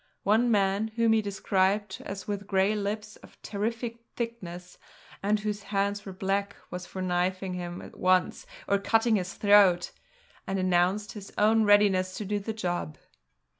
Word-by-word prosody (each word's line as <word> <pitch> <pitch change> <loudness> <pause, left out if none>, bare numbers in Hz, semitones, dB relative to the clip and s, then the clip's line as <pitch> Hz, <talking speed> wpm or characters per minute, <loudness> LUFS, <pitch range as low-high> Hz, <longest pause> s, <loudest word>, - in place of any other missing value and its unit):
One 220 +4 +3
man, 200 0 +2
whom 230 -1 +3
he 220 - +3
described 195 0 0
as 195 -1 -6
with 200 -1 -4
grey 195 +1 +2
lips 210 +1 -4
of - - -18
terrific 230 +3 -3 0.2
thickness, 180 -7 -6 0.4
and 210 +2 +1
whose 210 0 -3
hands 200 0 -1
were - - -5
black, 195 +2 -2 0.2
was 180 0 -6
for 185 - -5
knifing 185 +1 -1
him 175 -1 -5
at - - -12
once 185 0 +2 0.2
or 200 - +2
cutting 225 +2 +2
his 180 0 -4
throat, 200 -4 +5 0.6
and 195 - -1
announced 185 +3 +1
his 205 -2 -9
own 220 +1 +4
readiness 195 -3 +4
to 210 - -4
do 205 +1 -1
the 205 +3 -4
job. 175 -8 -3
200 Hz, 160 wpm, -28 LUFS, 185-210 Hz, 0.6 s, throat